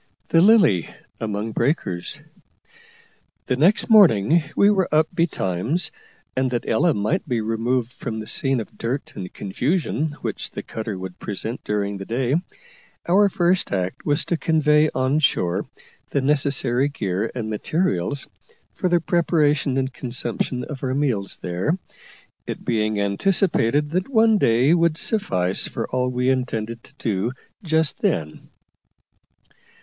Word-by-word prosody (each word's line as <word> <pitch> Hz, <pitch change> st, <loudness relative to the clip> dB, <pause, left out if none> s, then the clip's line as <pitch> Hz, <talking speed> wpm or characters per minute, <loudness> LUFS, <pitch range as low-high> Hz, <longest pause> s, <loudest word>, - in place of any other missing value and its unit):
THE 165 Hz, -, +5 dB
"LILY" 195 Hz, -, +5 dB, 0.3 s
AMONG 110 Hz, 0 st, -3 dB
BREAKERS. 95 Hz, -, -2 dB, 1.2 s
The 125 Hz, -, 0 dB
next 170 Hz, +11 st, +3 dB
morning 170 Hz, -, +6 dB
we 200 Hz, -, +5 dB
were 190 Hz, -3 st, +1 dB
up 155 Hz, +1 st, +4 dB
betimes, 155 Hz, -, 0 dB, 0.4 s
and, 130 Hz, 0 st, +1 dB
that 120 Hz, -1 st, -3 dB
Ella 155 Hz, +8 st, +2 dB
might 145 Hz, -, -1 dB
be 120 Hz, -2 st, +1 dB
removed 115 Hz, +2 st, -1 dB
from 110 Hz, -2 st, -5 dB
the 110 Hz, -, -6 dB
scene 135 Hz, +3 st, +1 dB
of 110 Hz, -, -8 dB
dirt 125 Hz, +5 st, -3 dB
and 90 Hz, -1 st, -6 dB
confusion 150 Hz, -, -1 dB
which -, -, -3 dB
the -, -, -7 dB
cutter 110 Hz, -3 st, -5 dB
would 95 Hz, -1 st, -8 dB
present 110 Hz, +4 st, -4 dB
during 100 Hz, -1 st, -2 dB
the 95 Hz, -, -7 dB
day, 125 Hz, +4 st, -1 dB, 0.7 s
our 200 Hz, +4 st, +5 dB
first 180 Hz, 0 st, +1 dB
act 95 Hz, +5 st, -2 dB
was 145 Hz, +1 st, +1 dB
to 170 Hz, -, -1 dB
convey 155 Hz, -1 st, +3 dB
on 130 Hz, +3 st, +1 dB
shore 90 Hz, -, +1 dB, 0.4 s
the -, -, 0 dB
necessary 135 Hz, -2 st, +2 dB
gear 100 Hz, -5 st, -2 dB
and 110 Hz, -3 st, -3 dB
materials 135 Hz, -, -1 dB, 0.5 s
for 185 Hz, -, -1 dB
the 175 Hz, 0 st, +3 dB
preparation 155 Hz, -5 st, +1 dB
and 130 Hz, 0 st, -1 dB
consumption 125 Hz, 0 st, -2 dB
of 145 Hz, -4 st, -7 dB
our 130 Hz, 0 st, -1 dB
meals 125 Hz, -9 st, -1 dB
there, 90 Hz, -, -1 dB, 0.7 s
it -, -, -6 dB
being 110 Hz, -2 st, 0 dB
anticipated 145 Hz, -, +1 dB
that 185 Hz, +7 st, -1 dB
one 225 Hz, -4 st, +4 dB
day 125 Hz, +5 st, +4 dB
would 170 Hz, -2 st, +2 dB
suffice 95 Hz, -, +1 dB
for -, -, -4 dB
all 125 Hz, 0 st, 0 dB
we 125 Hz, 0 st, -1 dB
intended 115 Hz, -3 st, -2 dB
to -, -, -18 dB
do 110 Hz, -1 st, -1 dB, 0.3 s
just 160 Hz, -4 st, 0 dB
then. 75 Hz, -1 st, -2 dB
130 Hz, 140 wpm, -22 LUFS, 110-160 Hz, 1.2 s, morning